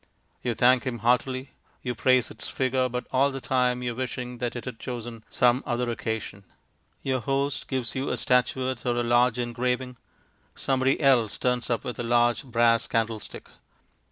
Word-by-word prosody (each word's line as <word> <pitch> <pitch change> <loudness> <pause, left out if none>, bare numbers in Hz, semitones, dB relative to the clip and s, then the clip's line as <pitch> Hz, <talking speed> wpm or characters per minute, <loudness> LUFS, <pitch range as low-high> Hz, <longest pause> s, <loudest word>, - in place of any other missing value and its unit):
You 120 -2 -1
thank 125 +2 +4
him 125 -2 -2
heartily, 130 +2 +1 0.3
you 125 - -2
praise 130 +1 +3
its - - -6
figure, 130 -1 0
but 125 +1 -3
all 135 +2 +3
the 135 -1 -5
time 125 -1 +1
you 120 - -1
are - - -7
wishing 125 -1 -4
that 120 0 -2
it 120 - -6
had 125 -3 -6
chosen 120 -3 -6
some 125 +1 +3
other 120 0 -1
occasion. 110 -3 -4 0.6
Your 130 -1 0
host 135 +4 -1
gives 130 -3 -2
you 135 +1 -2
a - - -1
statuette 130 -1 +1
or 120 -1 0
a 120 - +1
large 120 +1 +3
engraving; 125 +1 -2 0.6
somebody 135 0 +1
else 125 -7 +3
turns 125 -1 0
up 115 -3 0
with 125 - -5
a - - -1
large 120 +2 +2
brass 115 -2 +2
candle 115 -1 0
stick. - - -10
125 Hz, 180 wpm, -26 LUFS, 120-130 Hz, 0.6 s, thank